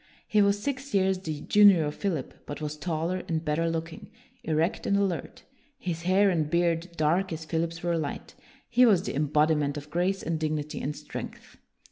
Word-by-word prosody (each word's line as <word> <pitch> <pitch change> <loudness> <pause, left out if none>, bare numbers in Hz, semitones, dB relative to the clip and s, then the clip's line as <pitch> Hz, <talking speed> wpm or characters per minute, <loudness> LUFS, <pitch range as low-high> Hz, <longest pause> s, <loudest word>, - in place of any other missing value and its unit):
He 215 - +3
was 200 0 +3
six 270 +2 -3
years 190 -1 +2
the 155 -5 -5
junior 200 -6 +6
of 150 - -3
Philip, 165 -9 -3
but 145 - -5
was 150 -1 -4
taller 170 +3 -2
and 160 0 -2
better 160 +2 +1
looking; 165 0 -5 0.3
erect 160 +3 0
and 200 - +3
alert, 195 -4 -2 0.3
his 170 -8 -4
hair 190 +3 +3
and 155 -4 0
beard 170 +1 +1
dark 170 +5 +1
as 160 0 -5
Philip's 165 +1 -2
were 170 -1 +1
light, 145 -3 -5 0.3
he 250 - +4
was 200 -7 +5
the - - -4
embodiment 150 0 +2
of 145 0 -9
grace 180 +4 0
and 165 -1 -2
dignity 155 -1 -2
and 150 +2 -3
strength. - - -8
165 Hz, 180 wpm, -27 LUFS, 155-190 Hz, 0.3 s, junior